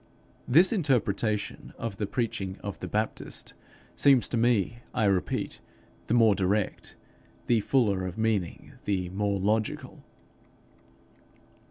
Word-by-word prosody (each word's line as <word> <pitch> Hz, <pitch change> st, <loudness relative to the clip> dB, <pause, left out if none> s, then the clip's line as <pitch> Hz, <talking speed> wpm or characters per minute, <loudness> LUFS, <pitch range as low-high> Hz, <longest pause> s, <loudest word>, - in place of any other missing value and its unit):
This 170 Hz, -, +5 dB
interpretation 110 Hz, -, 0 dB
of 115 Hz, -4 st, -5 dB
the 105 Hz, -, -2 dB
preaching 100 Hz, -5 st, -2 dB
of 100 Hz, -, -5 dB
the -, -, -5 dB
Baptist 110 Hz, +1 st, -3 dB, 0.4 s
seems 135 Hz, -4 st, +5 dB
to -, -, -2 dB
me, 115 Hz, -1 st, +2 dB, 0.2 s
I 115 Hz, -4 st, +2 dB
repeat, 95 Hz, -2 st, 0 dB, 0.5 s
the 115 Hz, -, +2 dB
more 115 Hz, -3 st, +6 dB
direct, 100 Hz, +1 st, -1 dB, 0.5 s
the 120 Hz, -2 st, +3 dB
fuller 100 Hz, -5 st, +1 dB
of 90 Hz, -, -7 dB
meaning, 110 Hz, -6 st, -1 dB
the 95 Hz, -3 st, -1 dB
more 100 Hz, +1 st, -1 dB
logical. 105 Hz, +3 st, -1 dB
105 Hz, 120 wpm, -28 LUFS, 100-120 Hz, 0.5 s, more